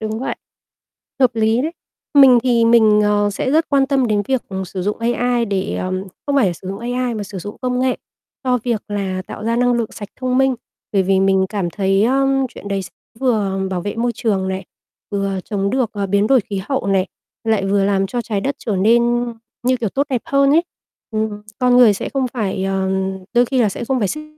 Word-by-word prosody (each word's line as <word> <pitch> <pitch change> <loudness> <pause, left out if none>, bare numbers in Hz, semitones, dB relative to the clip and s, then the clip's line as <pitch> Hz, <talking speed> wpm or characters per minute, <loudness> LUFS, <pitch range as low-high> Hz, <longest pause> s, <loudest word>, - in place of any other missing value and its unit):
đúng 220 0 -3
vậy. - - -3 0.8
Hợp 255 - +5
lý 225 +2 +2
đấy. 315 +3 -2 0.4
Mình 265 -3 +8
thì 240 -2 +3
mình, 220 -2 +5
ờ, 205 0 +2
sẽ 260 - -2
rất 320 +2 +2
quan 275 -2 +3
tâm 270 -2 +2
đến 210 -2 +1
việc 260 -2 +1 0.2
sử 185 0 -5
dụng 205 +2 -2
AI 240 +1 +1
để, 195 -2 -2
ờ 185 0 -3 0.3
không 285 - +1
phải 260 -7 +4
là 180 - +1
sử 185 +2 -9
dụng 195 - -4
AI 245 0 -2
mà 215 - -3
sử 195 -1 -7
dụng 205 +3 -7
công 250 0 0
nghệ 255 0 +1 0.5
cho 250 -1 +2
việc 235 -4 -1
là 190 -2 -2
tạo - - -8
ra 230 +1 0
năng 245 0 +3
lượng 235 -2 -1
sạch 205 -2 -8
thông 255 0 0
minh. 265 -1 +3 0.4
Bởi 195 - +3
vì 190 0 +2
mình 190 0 +3
cảm 195 -4 -2
thấy, 195 +2 +1
ơ, 270 +3 +2 0.2
chuyện 215 -4 -10
đấy 195 -1 -1
s 185 - -8 0.3
vừa 205 -7 +1
bảo 180 - -2
vệ 205 - -3
môi 240 +1 0
trường 195 -4 0
này, 190 0 -3 0.5
vừa 195 -1 -1
chống 200 -2 -1
được, 250 -3 0
ờ, 200 -2 -2
biến 200 +2 +2
đổi 260 0 +5
khí 200 -3 -5
hậu 270 -7 -1
này, 195 -1 +2 0.4
lại 220 -3 +1
vừa 195 0 +2
làm 195 -1 +1
cho 240 +5 -3
trái 210 -4 -2
đất 275 +7 -2
trở 215 -5 -2
nên, 225 +5 +4 0.6
như 255 +1 +2
kiểu, 230 -4 -2
tốt 280 +7 -1
đẹp 250 -3 0
hơn 275 0 +3
ấy. 320 +4 +5 0.5
Ừm, 215 -1 -2 0.2
con 250 -1 +4
người 240 -4 +7
sẽ - - -4
không 270 -2 0
phải, 195 -5 -2
ờ 195 0 0 0.4
đôi 240 +1 +4
khi 260 +2 -1
là 215 - +3
sẽ 205 - -5
không 260 +2 0
phải 205 -5 0
xích 305 +9 -4
220 Hz, 230 wpm, -19 LUFS, 195-250 Hz, 0.8 s, Mình